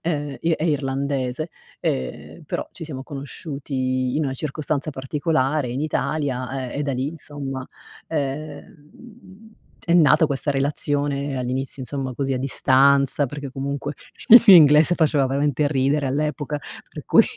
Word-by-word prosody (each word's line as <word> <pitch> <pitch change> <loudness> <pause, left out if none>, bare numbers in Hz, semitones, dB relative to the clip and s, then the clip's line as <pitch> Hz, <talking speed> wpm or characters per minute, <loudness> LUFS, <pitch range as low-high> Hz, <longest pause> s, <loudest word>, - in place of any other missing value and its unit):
ehm, 145 -4 -2
i 165 - 0
è 160 0 0
irlandese, 140 0 -1 0.3
ehm, 65 -1 -4
però - - -4
ci - - -11
siamo 135 -4 -7
conosciuti 135 -3 -3
in 155 - +1
una 135 -1 -2
circostanza 150 +1 -3
particolare 145 0 -1
in 125 +3 -3
Italia, 135 -3 -2
ehm, 145 - -4
e - - 0
da 140 -1 -1
lì 130 +1 -2
insomma, 140 -4 -6 0.4
ehm, 160 - -7 0.4
è 170 - +4
nata 160 -1 +5
questa 145 0 -2
relazione 140 0 -1
all'inizio 130 +2 -3
insomma 130 0 -4
così 135 +2 -2
a - - -1
distanza, 140 +1 +3
perché 145 +1 -7
comunque 140 +2 -4 0.3
il 235 +2 +10
mio 195 -4 +11
inglese 155 +2 +6
faceva 150 -4 +2
veramente 140 +2 0
ridere 140 0 +1
all'epoca, 150 +1 -2 0.3
per - - -9
cui - - +6
140 Hz, 140 wpm, -22 LUFS, 135-150 Hz, 0.4 s, mio